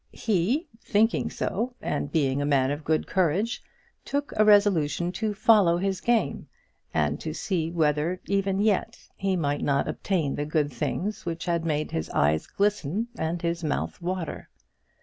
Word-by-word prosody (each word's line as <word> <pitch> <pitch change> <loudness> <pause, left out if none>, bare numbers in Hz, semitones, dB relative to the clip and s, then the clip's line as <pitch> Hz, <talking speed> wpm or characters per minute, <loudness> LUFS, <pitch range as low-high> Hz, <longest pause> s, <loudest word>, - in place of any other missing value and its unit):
He 225 - 0 0.2
thinking 220 +2 +2
so, 235 +6 -2
and 145 -1 -3
being 140 -3 +1
a - - 0
man 135 -2 +3
of 145 +2 -4
good 155 +1 +1
courage, 190 +6 0 0.4
took 285 0 -3
a 215 - +5
resolution 190 -5 +4
to 210 +2 -2
follow 200 -5 +5
his 190 0 -1
game, 235 -1 0 0.4
and - - 0
to - - -5
see 170 -5 -1
whether 160 +1 +1
even 195 -1 0
yet 205 -2 +1 0.2
he 195 -1 0
might 145 -4 -1
not 140 -1 +1
obtain 165 -8 -1
the 145 - -2
good 150 -3 0
things 200 - -2
which 170 -1 -4
had 170 -2 0
made 155 -1 -1
his 80 - -3
eyes 75 +2 +1
glisten 205 +1 0
and 165 -2 -3
his 170 0 -1
mouth 155 +3 -2
water. 180 -1 -4
175 Hz, 160 wpm, -26 LUFS, 150-205 Hz, 0.4 s, a